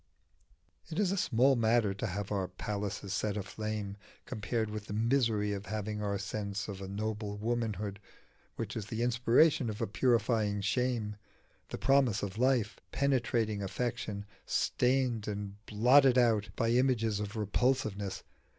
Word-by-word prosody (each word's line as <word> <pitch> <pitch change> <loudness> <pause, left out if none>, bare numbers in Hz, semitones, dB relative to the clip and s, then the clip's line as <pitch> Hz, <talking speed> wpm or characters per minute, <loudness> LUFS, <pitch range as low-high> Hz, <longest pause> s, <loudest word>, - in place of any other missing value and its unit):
_" - - -18
It 160 - -4
is 200 -3 +2
a - - +1
small 135 - +3
matter 115 -3 +3
to 100 +3 -3
have 100 +1 -4
our 95 -3 0
palaces 100 +1 -4
set 105 +1 -1
aflame 105 0 -4 0.3
compared 110 -1 -2
with 105 -1 -6
the 105 - -4
misery 115 -3 +2
of 100 0 -6
having 105 0 -3
our 100 -1 -1
sense 100 +1 -4
of 100 -2 -6
a 95 - -5
noble 105 +1 -3
womanhood, 105 -3 -2 0.6
which - - -4
is 105 -3 -4
the 115 +1 -2
inspiration 120 +3 +4
of 105 0 -5
a 115 - +1
purifying 110 -2 +1
shame, 110 0 0 0.5
the - - -4
promise 135 -7 +3
of 100 +2 -4
life 125 -4 +2
penetrating 120 -6 +1
affection, 100 0 -3 0.2
stained 125 -4 +1
and 105 0 -5
blotted 125 +4 +5
out 115 -4 +3
by 115 -2 +1
images 120 -4 +2
of 105 0 -4
repulsiveness. 105 -2 0
110 Hz, 150 wpm, -32 LUFS, 105-120 Hz, 0.6 s, blotted